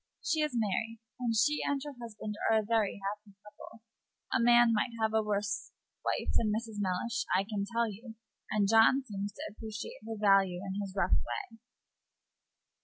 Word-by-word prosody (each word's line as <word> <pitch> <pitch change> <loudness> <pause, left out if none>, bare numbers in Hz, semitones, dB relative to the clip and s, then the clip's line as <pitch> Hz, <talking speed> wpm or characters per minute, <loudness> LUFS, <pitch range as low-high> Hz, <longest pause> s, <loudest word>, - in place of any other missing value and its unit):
She 315 -1 +1
is 300 -4 0
married, 225 +1 -1 0.2
and 235 -2 0
she 295 +7 +3
and 285 -1 0
her 290 - -6
husband 215 -2 -6 0.2
are 225 - +5
a 215 - +2
very 215 -2 +1
happy 205 0 -5
couple. 210 +2 -13 0.5
A - - +3
man 240 0 +6
might 225 +3 0
have 220 0 +1
a 220 - +4
worse 205 -1 -2 0.3
wife - - -1
than 225 - +3
Mrs. 220 0 -3
Mellish, 225 +6 -1
I 190 - +2
can 200 -1 -3
tell 235 0 +1
you; 220 +2 -9 0.3
and 205 -2 +2
John 225 +5 +5
seems 205 -3 -4
to - - -8
appreciate 215 0 -7
her 225 - -4
value 195 -3 +4
in 195 +1 -3
his 195 -1 -6
rough 185 -1 +1
way." 120 - -6
220 Hz, 180 wpm, -31 LUFS, 200-230 Hz, 0.5 s, man